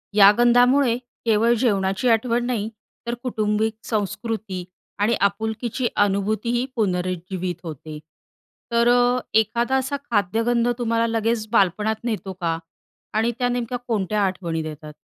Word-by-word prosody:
या 200 -1 +9
गंधामुळे 245 +1 +4
केवळ 235 -2 +1
जेवणाची 195 0 +1
आठवण 235 +1 +2
नाही, 225 -3 -1 0.4
तर 235 - -1
कौटुंबिक 215 -2 0
संस्कृती 210 -2 -3 0.4
आणि 215 +3 +3
आपुलकीची 220 +4 0 0.2
अनुभूतीही 215 +5 0
पुनरुज्जीवित 185 -3 -2
होते. 155 -1 -7 0.7
तर 235 0 +3
अ, 245 +1 +4 0.2
एखादा 235 +4 0
असा 265 +2 -1 0.2
खाद्यगंध 230 +4 +1
तुम्हाला 230 -1 +1
लगेच 225 0 0
बालपणात 210 +1 +2
नेतो 215 -5 -3
का? 170 -3 -2 0.6
आणि 225 +2 +2
त्या 245 - +1
नेमक्या 245 0 -2
कोणत्या 210 -2 0
आठवणी 170 -4 -2
देतात? 155 -1 -8
220 Hz, 120 wpm, -23 LUFS, 195-240 Hz, 0.7 s, या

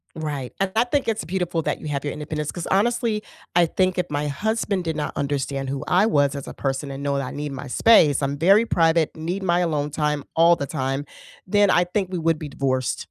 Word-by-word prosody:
Right, 145 -5 -4
and 195 -1 0
I 225 - +4
think 265 +3 -1
it's 225 -1 -1
beautiful 175 -2 -2
that - - -2
you - - -7
have 140 -2 -2
your 145 - -2
independence, 150 0 -4
'cause 175 - -6
honestly, 220 +1 +1 0.3
I 175 0 +6
think 185 +2 0
if 180 -1 0
my 145 0 -2
husband 200 +4 -1
did 165 -2 -2
not 150 - -3
understand 140 -1 -2
who 135 0 -3
I 185 +4 +4
was 145 -8 +2
as 140 - -6
a - - -8
person 135 +1 -3
and 135 0 -6
know 140 0 0
that 140 - -2
I - - -6
need 145 0 -5
my 140 - -7
space, 150 - +5
I'm 140 0 -1
very 195 +8 +5
private, 165 -5 +2
need 170 +5 -3
my 175 -1 +2
alone 150 -4 0
time 150 -1 -1
all 170 +1 +6
the 140 - -3
time, 135 -1 -2 0.4
then 205 +1 +4
I 175 - +4
think 185 +1 -2
we 185 - -2
would 165 -1 +1
be 155 - -6
divorced. 130 -2 -2
160 Hz, 235 wpm, -23 LUFS, 140-185 Hz, 0.4 s, I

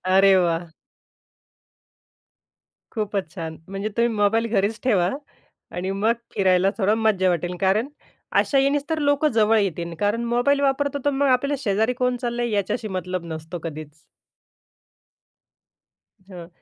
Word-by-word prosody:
अरे 195 +1 +5
वाह! 170 -1 0 2.3
खूपच 200 -6 -3
छान. 160 -2 -6
म्हणजे 195 +2 -3
तुम्ही 235 0 +2
मोबाईल 220 +3 +2
घरीच 210 +3 +1
ठेवा 190 -7 +2 0.7
आणि 185 +2 -2
मग 210 +4 +1 0.2
फिरायला 190 0 +3
थोडं 205 +2 +3
मज्जा 190 -4 +3
वाटेल 175 +1 -1
कारण 200 +6 +2 0.5
अशा 275 - +1
यानीच 280 +1 +2
तर 320 - 0
लोकं 285 +1 +2
जवळ 220 0 +3
येतील 170 -4 -2
कारण 210 +3 0
मोबाईल 280 +3 +2
वापरतो. 285 +1 0
तर 285 - +3
मग 280 +1 +1
आपल्याला 275 +2 +2
शेजारी 220 +3 +1
कोण 250 0 +2
चाललंय 240 0 -2
याच्याशी 210 +2 -1
मतलब 180 -1 -4
नसतो 160 +2 -6
कधीच. 155 -1 -7 2.3
हं, 175 -3 -10
205 Hz, 130 wpm, -23 LUFS, 180-240 Hz, 2.3 s, अरे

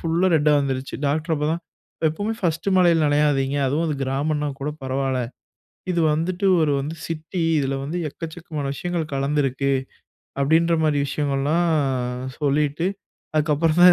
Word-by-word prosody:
ஃபுல்லா 165 +3 +1
ரெட்டா 150 0 +3
வந்துருச்சு. 135 -1 -3
டாக்டர் 155 +4 0
அப்ப 150 - -2
தான் 170 - -2 0.5
எப்போவுமே 205 +8 -2
ஃபர்ஸ்ட்டு 170 +2 0
மழையில 170 -3 +4
நனையாதீங்க. 145 -2 +2
அதுவும் 150 +5 0
அது 150 - 0
கிராமம்னா 145 +3 -1
கூட 145 - -1
பரவால்ல 130 0 0 0.7
இது 170 -1 +1
வந்துட்டு 175 +5 -1 0.2
ஒரு 155 -2 +2
வந்து 150 +4 -4
சிட்டி 165 +2 -4 0.2
இதில 135 -1 -1
வந்து 155 +6 -3
எக்கச்சக்கமான 160 -1 -6
விஷயங்கள் 170 0 -3
கலந்திருக்கு. 140 -1 0 0.7
அப்டின்ற 165 +4 +3
மாரி 150 -2 +2
விஷயங்கள்லாம் 145 +4 0 0.7
சொல்லிட்டு 150 +3 +1 0.5
அதுக்கப்புறம் 155 +2 +2
தான் 180 0 +10
150 Hz, 135 wpm, -23 LUFS, 140-165 Hz, 0.7 s, தான்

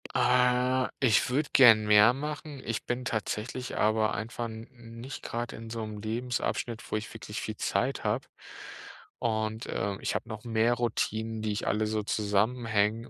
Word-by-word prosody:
Äh, 125 +1 +3
ich 120 -2 +3
würde 140 +4 0
gern 115 -5 +8
mehr 105 +3 +7
machen. 150 0 -6
Ich 115 -1 -3
bin 125 +1 -2
tatsächlich 115 +2 -3
aber 110 0 +2
einfach 115 +3 -4
n 110 0 -7 0.3
nicht 130 +4 -7
grad 120 +1 -4
in 115 0 -9
so 115 -1 -4
'nem 105 -1 -7
Lebensabschnitt, 115 0 -2
wo - - +1
ich 110 - -7
wirklich - - -6
viel - - -4
Zeit - - -1
habe - - -1 0.9
und, 110 -1 -1
äh, 100 -1 -2
ich - - -1
habe - - -3
noch 110 -1 -7
mehr 115 0 +2
Routinen, 115 -2 -1
die 110 - 0
ich 105 - -3
alle 110 +1 +1
so 110 0 -1
zusammenhänge, 110 +1 0
115 Hz, 165 wpm, -29 LUFS, 110-125 Hz, 0.9 s, gern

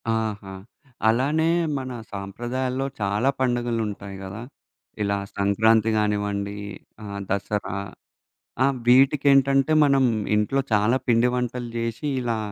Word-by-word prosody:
ఆహా! 105 -3 -3 0.6
అలానే 145 +8 +2 0.3
మన 130 -1 -5 0.2
సాంప్రదాయాల్లో 120 +7 -3
చాలా 105 +5 +1
పండుగలు 120 -2 0
ఉంటాయి 100 -1 -7
కదా! 95 +3 -7 0.6
ఇలా 100 0 0 0.2
సంక్రాంతి 110 +3 +3
గానివ్వండి 105 -1 -1 0.5
ఆహ్, 100 -1 -6
దసరా 100 0 -2 0.9
ఆ! - - +5 0.2
వీటికేంటంటే 135 +2 +4
మనం 140 -2 +4 0.3
ఇంట్లో 105 +6 +1
చాలా 105 +4 +3
పిండి 120 +1 +4
వంటలు 125 -1 -3
జేసి 115 +4 -3
ఇలా 120 -2 -1
115 Hz, 105 wpm, -24 LUFS, 100-130 Hz, 0.9 s, ఆ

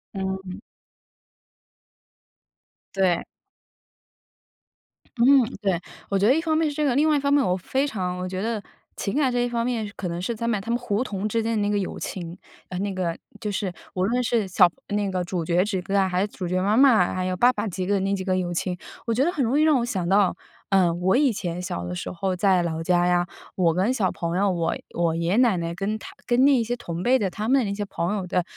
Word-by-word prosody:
嗯。 190 0 -4 2.4
对。 185 -3 +2 1.9
嗯， 260 +2 +6 0.2
对。 190 -4 +1 0.3
我 195 - +1
觉 200 - +3
得 260 - +5
一 325 - +1
方 320 -1 +1
面 320 -1 +2
是 290 - -6
这 300 - 0
个， 275 - +2
另 295 +5 +3
外 305 - +4
一 - - +2
方 280 0 +1
面 285 - +4
我 180 -6 +1
非 265 +10 -1
常 180 -7 -3
我 180 0 -3
觉 185 0 -4
得 220 -1 -2 0.4
情 200 - -3
感 280 -3 +2
这 245 - 0
一 245 - +1
方 235 -1 -1
面， 230 -4 -2
可 180 - -4
能 170 +1 -4
是 230 +5 -2
他 230 - -4
们 230 -3 +1
他 225 - -9
们 235 - +2
胡 240 -2 -1
同 205 -2 -3
之 225 +2 0
间 225 +1 -1
的 210 - +1
那 205 - +1
个 205 - +1
友 190 - -4
情， 175 -1 -6 0.3
呃， 180 - -6
那 200 0 -2
个 180 -3 -2 0.2
就 210 -2 -3
是 190 -2 -2 0.2
无 185 - -1
论 240 +6 +1
是 230 -3 +1
小 180 -1 +5 0.2
那 205 -1 0
个 185 -1 -1
主 175 -2 -3
角 175 +2 +2
之 200 -2 -2
间 195 +2 -3
啊， 190 -1 +3
还 180 - 0
是 205 - +1
主 200 -2 -7
角 185 0 0
妈 205 +3 +2
妈， 240 -8 +5
还 185 0 -1
有 185 0 -2
爸 245 +5 +5
爸 210 -1 -3
几 185 -2 -3
个 200 +1 +1
那 195 +1 0
几 190 -1 -3
个 185 -1 +1
友 175 -1 -2
情。 180 +1 -2 0.3
我 230 - +1
觉 255 +5 +2
得 345 - +2
很 295 -6 -1
容 250 +5 +1
易 305 - +4
让 310 -4 +4
我 235 - -1
想 185 -7 -2
到， 195 -1 +3 0.3
呃， 185 -4 +4
我 180 +4 +1
以 275 0 +4
前 180 -4 -4
小 90 - -4
的 90 - -4
时 - - -5
候 185 +1 -2
在 185 -1 +3
老 165 -1 -3
家 175 0 +2
呀， 175 0 +2 0.3
我 170 -3 +3
跟 195 +8 +1
小 200 -8 +1
朋 170 0 -3
友， 200 0 +2
我 170 -2 -1 0.2
我 170 -1 +1
爷 170 0 -1
爷 200 - +2
奶 240 -5 +4
奶 170 -1 -3
跟 200 +5 -2
他 - - -11
跟 245 +1 +3
那 280 +1 +6
一 250 - +3
些 240 +2 -2
同 170 -8 -6
辈 250 +7 +4
的， 200 -6 -1
他 210 +4 -4
们 270 - +4
的 245 - 0
那 200 - -2
些 205 0 -3
朋 180 -1 -2
友 190 -2 -4
的 180 0 +1
195 Hz, 270 characters per minute, -24 LUFS, 180-235 Hz, 2.4 s, 嗯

